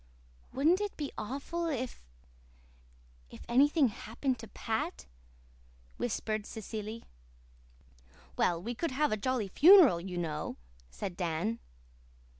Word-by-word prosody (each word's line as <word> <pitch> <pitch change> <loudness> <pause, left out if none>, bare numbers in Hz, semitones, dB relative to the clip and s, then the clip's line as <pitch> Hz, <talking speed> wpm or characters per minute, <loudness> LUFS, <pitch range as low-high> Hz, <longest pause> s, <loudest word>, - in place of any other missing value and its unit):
"Wouldn't 320 +8 +3
it 415 -1 -3
be 290 -3 -4
awful 280 +9 -3
if 255 -5 -3 1.3
if - - -12
anything 280 +3 +4
happened 235 +4 -3
to 225 - -9
Pat?" 200 - -3 0.9
whispered 215 -2 -2
Cecily. 220 +1 -6 1.3
"Well, 170 -1 +2
we 230 +8 -4
could 330 +8 -2
have 295 +3 +1
a - - +2
jolly 225 -1 -1
funeral, 310 - +7
you 180 0 -6
know," 155 -3 -3 0.3
said 175 - -6
Dan. 180 +6 -2
230 Hz, 110 wpm, -31 LUFS, 200-280 Hz, 1.3 s, funeral